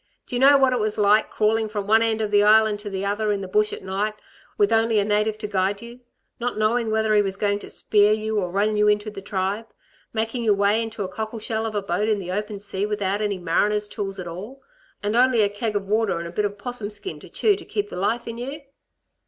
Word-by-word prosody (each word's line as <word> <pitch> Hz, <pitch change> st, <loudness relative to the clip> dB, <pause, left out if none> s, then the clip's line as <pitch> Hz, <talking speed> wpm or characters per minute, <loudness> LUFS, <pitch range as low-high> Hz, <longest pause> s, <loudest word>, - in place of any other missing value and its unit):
Do 250 Hz, -, -6 dB
y' -, -, +1 dB
know 280 Hz, +2 st, +7 dB
what 265 Hz, -1 st, +3 dB
it 250 Hz, -, 0 dB
was 215 Hz, -1 st, -1 dB
like, 210 Hz, +1 st, +4 dB
crawling 220 Hz, +1 st, +1 dB
from 205 Hz, -2 st, -3 dB
one 220 Hz, +2 st, +4 dB
end 225 Hz, -1 st, +1 dB
of 210 Hz, -1 st, -2 dB
the 205 Hz, 0 st, +5 dB
Island 215 Hz, 0 st, +5 dB
to 205 Hz, 0 st, -7 dB
the 195 Hz, 0 st, -3 dB
other 210 Hz, +1 st, 0 dB
in 200 Hz, -1 st, -1 dB
the 190 Hz, -, -5 dB
bush 210 Hz, +3 st, +2 dB
at -, -, -7 dB
night 200 Hz, +3 st, -2 dB, 0.4 s
with 410 Hz, -1 st, +3 dB
only 225 Hz, 0 st, +3 dB
a 205 Hz, -, +3 dB
native 210 Hz, +1 st, +1 dB
to 215 Hz, -1 st, -5 dB
guide 200 Hz, +1 st, -1 dB
you... 235 Hz, +1 st, -11 dB, 0.4 s
not 245 Hz, -1 st, -2 dB
knowing 225 Hz, +2 st, +1 dB
whether 220 Hz, 0 st, +1 dB
he 210 Hz, -, +5 dB
was 195 Hz, -1 st, -3 dB
going 205 Hz, 0 st, 0 dB
to -, -, -10 dB
spear 210 Hz, 0 st, +3 dB
you, 215 Hz, 0 st, 0 dB
or 180 Hz, -3 st, -2 dB
run 205 Hz, +4 st, +1 dB
you 210 Hz, 0 st, +3 dB
into 210 Hz, +1 st, +1 dB
the 200 Hz, -2 st, -8 dB
tribe... 195 Hz, +3 st, -2 dB, 0.4 s
making 225 Hz, +2 st, -2 dB
your 215 Hz, -3 st, +3 dB
way 205 Hz, +3 st, +2 dB
in 225 Hz, -, -2 dB
a 200 Hz, -3 st, -2 dB
cockle 220 Hz, +4 st, -5 dB
shell 220 Hz, 0 st, -2 dB
of 215 Hz, -, -6 dB
a 205 Hz, -, -1 dB
boat 200 Hz, +4 st, -1 dB
in 215 Hz, -, +2 dB
the 180 Hz, -2 st, -5 dB
open 210 Hz, +1 st, -3 dB
sea 195 Hz, -1 st, -3 dB
without 205 Hz, -1 st, -1 dB
any 205 Hz, -2 st, -1 dB
mariner's 205 Hz, +5 st, +1 dB
tools 195 Hz, -1 st, -4 dB
at 185 Hz, -, -6 dB
all, 205 Hz, +11 st, -8 dB, 0.4 s
and 210 Hz, +2 st, 0 dB
only 245 Hz, -2 st, +4 dB
a 205 Hz, -, +2 dB
keg 210 Hz, +1 st, -3 dB
of 200 Hz, -1 st, -1 dB
water 215 Hz, -2 st, +1 dB
and 170 Hz, 0 st, -5 dB
a -, -, -8 dB
bit 210 Hz, +4 st, 0 dB
of 205 Hz, 0 st, -3 dB
'possum 225 Hz, -1 st, -5 dB
skin 215 Hz, -, -6 dB
to -, -, -13 dB
chew 420 Hz, -2 st, +2 dB
to 390 Hz, -, -10 dB
keep 205 Hz, -1 st, -3 dB
the -, -, -6 dB
life 225 Hz, +6 st, -1 dB
in 230 Hz, 0 st, -6 dB
you? 275 Hz, +5 st, -5 dB
210 Hz, 260 wpm, -23 LUFS, 205-220 Hz, 0.4 s, know